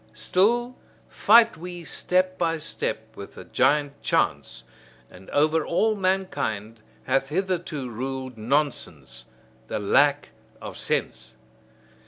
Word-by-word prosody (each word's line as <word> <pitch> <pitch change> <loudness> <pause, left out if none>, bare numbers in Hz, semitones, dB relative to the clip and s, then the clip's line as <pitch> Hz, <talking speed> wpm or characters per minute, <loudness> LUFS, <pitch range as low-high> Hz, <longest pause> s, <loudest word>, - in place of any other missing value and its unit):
Still 215 - +1 0.3
fight 230 +1 +5
we 175 +1 -8
step 185 +3 0
by 165 -1 +1
step 110 -8 -4
with 100 - -10
the - - -10
giant 145 -1 +1
Chance, 65 0 -1 0.5
and 95 +1 -14
over 155 +2 +2
all 215 +8 +1
mankind 185 - -2 0.2
hath 135 0 0
hitherto 170 -5 -2
ruled 130 +2 -5
nonsense, 120 - -2 0.4
the - - -3
lack 140 +8 +2 0.3
of - - -8
sense. 60 0 -2
150 Hz, 110 wpm, -25 LUFS, 115-185 Hz, 0.5 s, fight